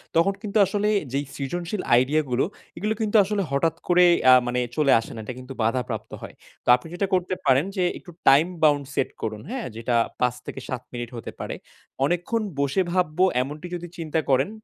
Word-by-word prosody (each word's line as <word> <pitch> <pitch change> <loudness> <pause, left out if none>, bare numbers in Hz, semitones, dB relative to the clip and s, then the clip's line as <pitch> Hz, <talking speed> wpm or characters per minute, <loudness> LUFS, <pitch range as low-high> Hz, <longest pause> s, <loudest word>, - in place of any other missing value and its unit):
তখন 170 +4 +4
কিন্তু 210 0 -2
আসলে 205 +2 0 0.2
যেই 140 +1 -1
সৃজনশীল 175 +7 -3
আইডিয়া 135 +6 +3
গুলো, 125 +1 +1 0.3
এগুলো 215 +2 0
কিন্তু 215 0 -1
আসলে 200 +1 -1
হঠাৎ 150 +4 +1
করে 180 0 +6 0.3
আ - - +10
মানে 125 0 0 0.2
চলে 150 -3 +3
আসে 115 - -8
না। - - -7
এটা 130 - -5
কিন্তু 130 +1 -9
বাধাপ্রাপ্ত 120 +1 -2
হয়। - - -9 0.3
তো - - -32
আপনি 125 +6 -8
যেটা 195 +2 -1
করতে 185 0 +1
পারেন 135 +3 +4
যে, 185 - +1 0.2
একটু 175 - -13 0.2
টাইম 145 +5 +6 0.2
বাউন্ড 145 -2 +4
সেট - - 0
করুন। 110 -1 -4
হ্যাঁ? 255 -2 -4
যেটা 115 +1 -1 0.3
৫ 125 -1 +2
থেকে - - -6
৭ 125 -1 -3
মিনিট 120 -1 -5
হতে 115 - -7
পারে। - - -4 0.5
অনেকক্ষণ 175 +8 0 0.2
বসে 140 +7 +1
ভাবব 175 -3 0 0.2
এমনটি 150 +6 -6
যদি 175 0 -6
চিন্তা 160 -1 -1
করেন, 135 +6 +3
155 Hz, 195 wpm, -24 LUFS, 130-180 Hz, 0.5 s, আ